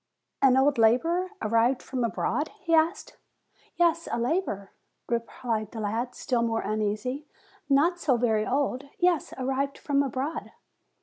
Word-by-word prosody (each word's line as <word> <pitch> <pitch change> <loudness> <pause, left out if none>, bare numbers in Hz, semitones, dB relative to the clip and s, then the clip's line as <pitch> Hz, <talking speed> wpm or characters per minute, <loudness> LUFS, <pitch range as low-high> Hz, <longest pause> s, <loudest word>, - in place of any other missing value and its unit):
"An 265 -1 +5
old 270 -1 +3
laborer, 330 +12 +3
arrived 230 +4 +2
from 255 -2 -3
abroad?" 235 - -1
he 335 -3 -1
asked. 325 +4 +2 0.6
"Yes, 335 -1 +2
a - - 0
laborer," 235 - -1 0.4
replied 230 -2 -2
the 225 - -7
lad, 225 +4 -2
still 245 -3 0
more 225 -1 0
uneasy; 215 +7 -2 0.4
"not 325 +6 +3
so 270 -7 +2
very 220 -3 +1
old. 270 0 0
Yes, 355 -3 +2
arrived 270 +1 -1
from 280 -1 +1
abroad." 275 +3 -3
260 Hz, 135 wpm, -27 LUFS, 230-300 Hz, 0.6 s, An